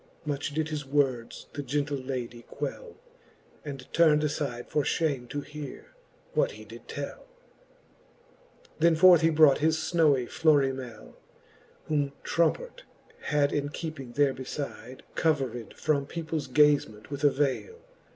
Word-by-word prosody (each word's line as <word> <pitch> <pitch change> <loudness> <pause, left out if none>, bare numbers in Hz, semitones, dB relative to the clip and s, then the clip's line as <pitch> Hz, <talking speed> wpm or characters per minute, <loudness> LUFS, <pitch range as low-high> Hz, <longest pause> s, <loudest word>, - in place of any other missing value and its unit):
Much 145 -1 -2
did 155 0 0
his 150 -1 -3
words 135 -4 -1
the 145 - -4
gentle 145 +2 -1
ladie 130 -3 -5
quell, 485 -2 -6 0.7
And 135 -3 -7
turn'd 155 -3 +5
afide 140 -5 -2
for 150 - +1
fhame 140 -4 -1
to 145 0 -3
heare, 150 -1 -9 0.4
what - - +1
he - - -11
did - - -12
tell, - - -6
XVII. - - -29
Then 170 -1 +5
forth 175 0 +7
he 165 - +4
brought 155 -3 +5
his 160 +1 +2
fnowy 155 -6 +2
I'lorimele, 135 -7 0 0.7
Whom 145 -2 0
Trompart - - 0 0.4
had 145 -1 +2
in 145 0 -1
keeping 145 -5 -6
there 140 -1 +3
befide, 130 -2 -7
Covered 135 -8 -1
from 140 -2 0
people's 160 -3 -4
gazement 140 -5 +2
with 140 0 -5
a 145 - +7
vele. 145 - -1
145 Hz, 135 wpm, -28 LUFS, 135-160 Hz, 0.7 s, forth